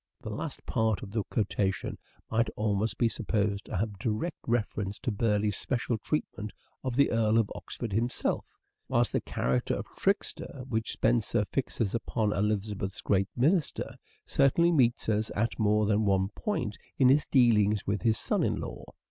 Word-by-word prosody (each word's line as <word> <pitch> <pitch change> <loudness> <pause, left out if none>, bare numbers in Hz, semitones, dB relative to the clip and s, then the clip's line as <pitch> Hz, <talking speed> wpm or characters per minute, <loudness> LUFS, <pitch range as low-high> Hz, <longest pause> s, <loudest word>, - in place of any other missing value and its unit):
The - - -6
last - - -5
part 110 -2 +1
of 100 - -8
the 110 0 0
quotation 100 -3 -1 0.4
might 115 +1 +2
almost 105 0 0
be 120 - +3
supposed 105 -3 -1
to - - -4
have 105 0 -2
direct 115 - -2
reference 105 -4 -1
to 120 - -2
Burleigh's 105 -1 +1
special 120 -3 -1
treatment 110 -5 -3 0.3
of 130 -2 -2
the 140 +2 +4
Earl 115 -1 +3
of 115 -3 +2
Oxford 115 -5 -6
himself; 115 +4 -1 0.3
whilst - - +2
the - - +1
character 65 0 0
of - - -4
trickster, 130 - -1
which 110 -3 -1
Spenser 110 -2 +2
fixes 115 -4 -2
upon 110 -2 0
Elizabeth's 100 -1 -1
great 95 -1 +1
minister, 155 +6 +1 0.3
certainly 170 +5 +3
meets 125 -7 +3
us 110 0 +1
at 115 +4 -1
more 105 0 +3
than 105 +1 +2
one 95 -1 +2
point 125 - -3 0.2
in 130 - +5
his 140 +3 +4
dealings 105 -6 +4
with 100 -1 -1
his 110 +1 +2
son - - 0
in - - +1
law. - - -6
110 Hz, 165 wpm, -29 LUFS, 105-120 Hz, 0.4 s, in